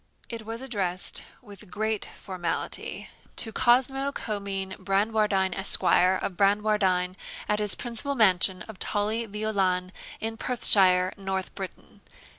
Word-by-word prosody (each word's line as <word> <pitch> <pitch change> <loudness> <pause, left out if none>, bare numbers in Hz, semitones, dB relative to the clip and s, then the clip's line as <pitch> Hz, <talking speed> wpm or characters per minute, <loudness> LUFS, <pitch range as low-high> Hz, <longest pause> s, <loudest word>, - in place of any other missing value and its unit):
It 230 -2 -7
was 230 +3 -6
addressed, 190 -8 -2 0.2
with 205 -2 -14
great 215 +1 -2
formality, 180 -4 -5 0.3
'To 225 - +1
Cosmo 265 +4 +2
Comyne 200 -5 -4
Bradwardine, 200 -1 +1
Esq., 195 - +1
of 185 +1 +2
Bradwardine, 195 -2 +1 0.3
at 210 0 0
his 210 -2 +3
principal 245 +4 -3
mansion 190 -4 +3
of 220 -4 -12
Tully 215 +3 -1
Veolan, 195 -4 -1 0.3
in 225 0 -4
Perthshire, 190 -7 +5
North 190 -1 -4
Britain. 190 -2 -9
205 Hz, 115 wpm, -26 LUFS, 190-220 Hz, 0.3 s, Perthshire